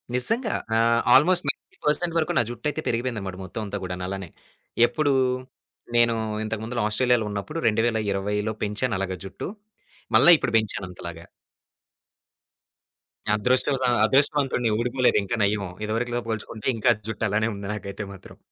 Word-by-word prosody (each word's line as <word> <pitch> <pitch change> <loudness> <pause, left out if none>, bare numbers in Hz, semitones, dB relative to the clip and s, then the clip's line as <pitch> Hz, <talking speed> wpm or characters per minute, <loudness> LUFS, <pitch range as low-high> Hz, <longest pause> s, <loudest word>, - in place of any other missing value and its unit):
నిజంగా 225 - +1 0.2
ఆహ్, 115 +1 +3
almost 175 +4 +5
90 - - -4
percent 165 +3 +1
వరకు 160 - +1
నా - - +5
జుట్టయితే 145 +6 -3
పెరిగిపోయిందన్నమాట 115 -6 -2
మొత్తమంతా 100 +2 -5
గూడాను 90 0 -4
అలానే. 95 -2 -5 0.6
ఎప్పుడు 145 +3 +1 0.8
నేను 120 -1 +4 0.3
ఇంతకుముందల 110 +2 -3
ఆస్ట్రేలియాలో 120 +1 +2
ఉన్నప్పుడు 105 +11 -4
2020 105 -2 0
పెంచాను 105 +3 -1
అలాగా 95 -1 -3
జుట్టు. 95 - -6 0.7
మల్ల - - +7
ఇప్పుడు 115 - -2
బెంచానంతలాగా. 90 -6 -4 2.1
అదృష్టవసా 130 +4 +1 0.2
అదృష్టవంతుడిని 135 -2 +2
ఊడిపోలేదు 125 +2 +2
ఇంకా 120 +4 -2
నయము. 100 -2 0
ఇదివరకులా 120 +3 -1
పోల్చుకుంటే 110 0 -5
ఇంకా 115 +2 +4 0.2
జుట్టు 110 0 -2
అలానే 110 +2 +1
ఉంది 100 0 -7
నాకైతే 100 0 -6
మాత్రం. 95 - -14
110 Hz, 120 wpm, -25 LUFS, 100-125 Hz, 2.1 s, మల్ల